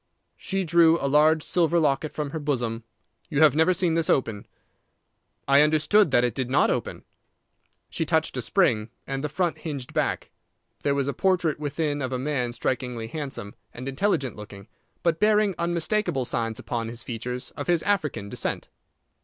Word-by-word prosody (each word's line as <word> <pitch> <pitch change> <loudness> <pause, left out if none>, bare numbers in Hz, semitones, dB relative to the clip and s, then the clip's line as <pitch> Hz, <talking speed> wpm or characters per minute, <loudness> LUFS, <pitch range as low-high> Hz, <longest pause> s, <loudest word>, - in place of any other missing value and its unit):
She 195 -1 -3
drew 170 -1 +4
a - - -3
large 150 +2 +4
silver 170 -1 +2
locket 150 -1 +1
from 150 -2 -4
her 160 - -4
bosom. 120 -6 -2 0.5
"You 150 -1 0
have 150 -2 +6
never 160 +4 +4
seen 180 -2 +1
this 165 -1 0
open." 110 -6 0 1.0
"I 140 +1 +6
understood 155 +6 +4
that 120 -2 +3
it 120 -2 +1
did 130 0 -3
not 130 - +3
open." - - -3 0.8
She - - -3
touched - - 0
a - - -2
spring, 110 +1 +1 0.2
and 135 +1 -4
the 150 - -1
front 175 +3 -1
hinged 140 -6 -6
back. - - -1 0.5
There 140 -1 +1
was 140 -1 0
a 140 - -1
portrait 180 -6 +1
within 145 0 -2
of 130 -1 -2
a 130 - -1
man 130 -2 -1
strikingly 120 -2 -3
handsome 135 -8 -5 0.2
and 125 +2 -7
intelligent 140 - 0
looking, 105 -1 -11 0.4
but 165 -2 +1
bearing 210 -1 +3
unmistakable 170 - 0
signs 115 -2 -2
upon 115 -1 -4
his 115 +1 -6
features 125 +2 -5
of - - -7
his 175 -2 +2
African 155 - -1
descent. - - -3
145 Hz, 170 wpm, -25 LUFS, 125-165 Hz, 1.0 s, have